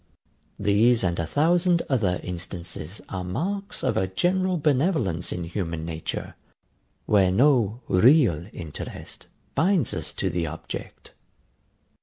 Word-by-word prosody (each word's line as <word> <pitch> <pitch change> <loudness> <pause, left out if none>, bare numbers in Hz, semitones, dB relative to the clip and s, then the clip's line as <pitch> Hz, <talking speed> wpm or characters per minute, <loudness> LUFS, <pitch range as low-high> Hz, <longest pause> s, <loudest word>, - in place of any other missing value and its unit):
These 105 +3 +3
and 85 -2 0
a 85 - -1
thousand 170 - +2
other 105 -10 +1
instances 90 0 -7
are 95 -2 -4
marks 190 - -3
of 110 - +1
a 95 - +1
general 180 - +1
benevolence 140 - +1
in 90 - -3
human 85 -2 -4
nature, 80 -1 -5 0.7
where 95 -3 +4
no 120 -1 +3
REAL 95 - +4
interest 80 -4 -8 0.3
binds 180 +3 +2
us - - -3
to 95 - -2
the 85 -1 -1
object. 80 +2 -8
100 Hz, 120 wpm, -25 LUFS, -, 0.7 s, where